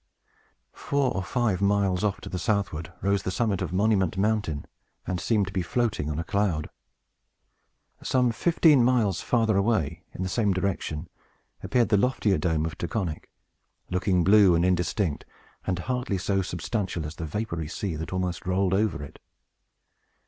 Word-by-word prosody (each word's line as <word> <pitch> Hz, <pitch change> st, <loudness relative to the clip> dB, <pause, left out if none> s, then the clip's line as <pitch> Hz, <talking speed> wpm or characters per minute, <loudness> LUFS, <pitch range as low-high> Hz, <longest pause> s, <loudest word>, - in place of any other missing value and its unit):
Four 140 Hz, -2 st, 0 dB
or 95 Hz, -, 0 dB
five 100 Hz, 0 st, 0 dB
miles 100 Hz, -2 st, +2 dB
off 105 Hz, -2 st, 0 dB
to -, -, -8 dB
the 90 Hz, -, -4 dB
southward 100 Hz, -6 st, -1 dB
rose 100 Hz, 0 st, +2 dB
the -, -, -3 dB
summit 100 Hz, -1 st, 0 dB
of 90 Hz, -4 st, -2 dB
Monument 95 Hz, -2 st, +2 dB
Mountain, 100 Hz, -7 st, 0 dB, 0.4 s
and 90 Hz, -2 st, -2 dB
seemed 105 Hz, +2 st, +2 dB
to 95 Hz, -, -8 dB
be 95 Hz, -, 0 dB
floating 110 Hz, -6 st, -1 dB
on 75 Hz, -, -3 dB
a 85 Hz, -, -1 dB
cloud. 90 Hz, -4 st, -1 dB, 1.3 s
Some 125 Hz, -2 st, +2 dB
fifteen 155 Hz, 0 st, +4 dB
miles 115 Hz, -7 st, +2 dB
farther 115 Hz, -3 st, +2 dB
away, 90 Hz, -6 st, 0 dB
in 95 Hz, -, -5 dB
the -, -, -1 dB
same 100 Hz, +1 st, +1 dB
direction, 90 Hz, -4 st, -2 dB, 0.5 s
appeared 120 Hz, -2 st, +1 dB
the 105 Hz, -, +4 dB
loftier 105 Hz, -5 st, +2 dB
Dome 80 Hz, -1 st, 0 dB
of 80 Hz, -1 st, -5 dB
Taconic, 85 Hz, -3 st, -3 dB, 0.7 s
looking 90 Hz, -1 st, +2 dB
blue 100 Hz, -1 st, +6 dB
and 85 Hz, +1 st, +2 dB
indistinct, 90 Hz, -2 st, 0 dB, 0.4 s
and 95 Hz, -2 st, 0 dB
hardly 125 Hz, +1 st, -2 dB
so 95 Hz, +1 st, 0 dB
substantial 90 Hz, -1 st, -3 dB
as 75 Hz, +2 st, -7 dB
the 80 Hz, -, -4 dB
vapory 85 Hz, -3 st, -3 dB
sea 95 Hz, +1 st, -3 dB
that 80 Hz, -, -5 dB
almost 90 Hz, -1 st, -3 dB
rolled 95 Hz, 0 st, +1 dB
over 100 Hz, -6 st, +1 dB
it. 70 Hz, -, -11 dB
95 Hz, 160 wpm, -26 LUFS, 85-110 Hz, 1.3 s, blue